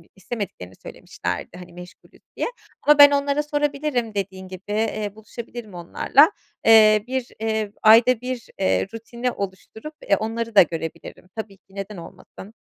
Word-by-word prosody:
istemediklerini 195 - -7
söylemişlerdi, - - -6
hani, 180 -1 -12
meşgulüz 180 +1 -14 0.2
diye - - -1 0.4
ama 295 0 +5
ben 285 0 +10
onlara 285 +1 +1
sorabilirim 290 -5 -1
dediğin 190 -1 -4
gibi, 185 -1 -9
eee, 210 -1 -2
buluşabilirim 220 0 -9
onlarla, 180 - +3 0.3
eee, 215 -2 +7
bir, 260 -1 -3
eee, 220 -2 -2
ayda 230 +2 +6
1 250 -1 -5
eee, 190 0 +1
rutini 235 +2 -4
oluşturup, 200 - -7
eee, 200 - +3
onları 225 0 -4
da - - +10
görebilirim. 165 +1 -4
Tabii 215 -3 -7
ki, 195 +1 -25
neden 195 +1 -6
olmasın. 185 +4 -12
220 Hz, 140 wpm, -22 LUFS, 190-245 Hz, 0.4 s, ben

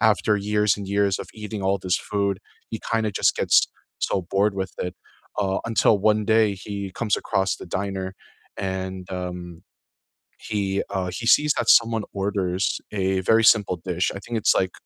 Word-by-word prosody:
after 105 -1 +3
years 105 0 +1
and 100 -1 -6
years 100 -1 +1
of - - -6
eating 105 -2 -6
all 95 +1 +1
this 90 -2 0
food, 100 -2 -1 0.3
he 110 - -4
kinda 110 -2 +1
just - - +2
gets - - +4 0.3
so 95 - 0
bored 100 +1 +2
with 95 -1 -3
it, 90 0 -3 0.4
uh, 95 -2 +1
until 110 -2 +3
one 105 +1 +3
day 110 -2 +4
he 100 0 -6
comes 110 -3 0
across 95 0 0
the - - -9
diner 95 +1 -3 0.4
and, 95 -1 -4
um, 90 -2 -6 0.8
he, 100 -2 -1
uh, 95 -2 -2
he 115 +3 -4
sees 150 +4 +5
that - - 0
someone 115 -2 +5
orders 95 -3 -1
a 95 -2 0
very 110 +4 +4
simple 105 -5 +5
dish, 90 0 0
I - - -5
think 115 +3 -4
it's 110 - +3
like 95 -1 +1
100 Hz, 175 wpm, -24 LUFS, 95-105 Hz, 0.8 s, sees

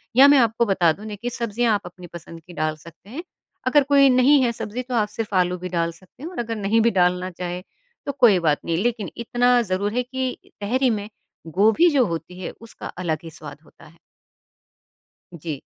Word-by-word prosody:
या 270 +3 +8
मैं 285 0 +6
आपको 230 -1 +2
बता 185 -5 +3
दूँ 210 - -12
ना 215 -1 -6
कि 235 +4 -4
सब्ज़ियाँ 235 -1 0
आप 205 - 0
अपनी 175 0 -11
पसंद 165 -1 -10
की 180 - -11
डाल 155 -1 -1
सकते 170 +5 -16
हैं, 310 +9 -6 0.4
अगर 285 +2 +5
कोई 280 -1 +5
नहीं 260 +3 +5
है 240 - +2
सब्ज़ी 235 +1 -5
तो 250 -1 -4
आप 215 -2 +2
सिर्फ 215 -2 -5
आलू 180 -1 +2
भी 180 +1 -6
डाल 170 -1 -1
सकते 185 - -18
हैं 330 - -5
और - - -7
अगर 230 -1 -3
नहीं 215 +2 +1
भी 235 - +3
डालना 180 -1 +1
चाहें, 180 +1 -5 0.4
तो 280 - -1
कोई 235 -9 +4
बात 155 -3 +1
नहीं, 165 - 0
लेकिन 230 -5 -2
इतना 245 +1 +2
ज़रूर 200 +1 -2
है 250 - 0
कि 260 0 -3 0.2
तहरी 255 +5 +1
में 210 -2 -3 0.4
गोभी 220 - +4
जो 260 -3 +4
होती 170 0 -6
है, - - -5
उसका 230 - -10
अलग 165 -4 -3
ही 165 - -8
स्वाद 150 -1 -11
होता - - -19
है। 165 +2 -18 1.4
जी। 150 -3 -5
210 Hz, 215 wpm, -22 LUFS, 175-245 Hz, 1.4 s, या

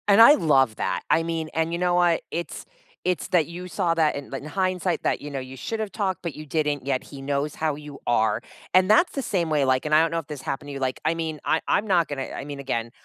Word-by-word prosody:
And 205 +2 +7
I 235 +6 +10
love 135 - +3
that, 90 - -1
I 165 - +4
mean 165 -1 -3
and 160 +1 0
you 170 - -2
know 180 0 +2
what? 175 -2 +3
It's 170 +1 -5 0.4
it's 180 -3 -1
that 170 -5 +3
you 180 +2 -7
saw 180 -2 0
that, 160 -2 +2
in 140 -1 -7
in 135 +1 -5
hindsight 185 +1 -1
that, - - 0
you 145 - -7
know, 140 - -3
you 130 - -9
should’ve 220 -2 -2
talked, 195 -4 -2
but 170 -3 -4
you 155 - -8
didn't, 145 -3 0
yet 130 -2 +1
he 140 - -11
knows 145 +1 -1
how 155 - +3
you 150 0 -10
are, 110 -3 +2 0.4
and 185 0 +7
that's 285 +12 +5
the 275 - -3
same 170 -3 +1
way, 150 -3 +2
like- 130 +1 +2
and 150 0 +3
I 155 - +7
don't 165 -1 +1
know 165 - +1
if 155 - -9
this 150 -3 -7
happened 135 +2 -4
to - - -6
you- 135 - -5
like 130 - -5
I 160 - +3
mean, 160 -2 -3
I 160 - +2
'm 215 - +1
not 175 -4 +3
gonna 140 -2 -3 0.2
I - - -8
mean, 145 -1 -7
again, 115 -4 -3
160 Hz, 270 wpm, -25 LUFS, 140-180 Hz, 0.4 s, I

